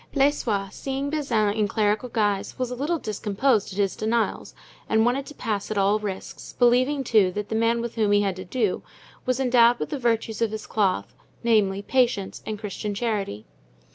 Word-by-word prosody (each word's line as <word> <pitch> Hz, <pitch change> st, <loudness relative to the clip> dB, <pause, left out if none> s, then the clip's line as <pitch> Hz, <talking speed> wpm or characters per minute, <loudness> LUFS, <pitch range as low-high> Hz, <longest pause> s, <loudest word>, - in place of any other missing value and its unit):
Blaisois 240 Hz, -8 st, +1 dB
seeing 275 Hz, +1 st, -3 dB
Bazin 230 Hz, -9 st, +1 dB
in 210 Hz, -1 st, +1 dB
clerical 210 Hz, +4 st, 0 dB
guise, 205 Hz, -4 st, -1 dB
was 255 Hz, -1 st, -2 dB
a -, -, -3 dB
little 295 Hz, +7 st, -1 dB
discomposed 215 Hz, -1 st, 0 dB
at 190 Hz, -, -8 dB
his 200 Hz, -2 st, +1 dB
denials 225 Hz, +1 st, -1 dB, 0.3 s
and 220 Hz, 0 st, +3 dB
wanted 265 Hz, +3 st, 0 dB
to 295 Hz, -, -10 dB
pass 210 Hz, -4 st, -3 dB
at 215 Hz, -, -2 dB
all 200 Hz, +2 st, +3 dB
risks, 200 Hz, -3 st, -6 dB
believing 255 Hz, +3 st, +3 dB
too, 215 Hz, -6 st, +3 dB
that 205 Hz, +1 st, -4 dB
the 220 Hz, -, -2 dB
man 230 Hz, +1 st, +2 dB
with 235 Hz, -1 st, -4 dB
whom 215 Hz, -3 st, +1 dB
he 205 Hz, 0 st, +4 dB
had 195 Hz, -2 st, 0 dB
to 185 Hz, -, -6 dB
do 215 Hz, 0 st, -1 dB, 0.5 s
was 255 Hz, 0 st, +1 dB
endowed 245 Hz, -2 st, +5 dB
with -, -, -4 dB
the 290 Hz, -, -3 dB
virtues 230 Hz, -2 st, 0 dB
of 230 Hz, -, +2 dB
his 220 Hz, +1 st, -6 dB
cloth, 185 Hz, -, 0 dB, 0.3 s
namely, 205 Hz, -4 st, +2 dB
patience 240 Hz, -6 st, 0 dB
and 215 Hz, -, -3 dB
Christian 210 Hz, 0 st, -4 dB
charity. 200 Hz, -, -2 dB
220 Hz, 190 wpm, -25 LUFS, 205-245 Hz, 0.5 s, endowed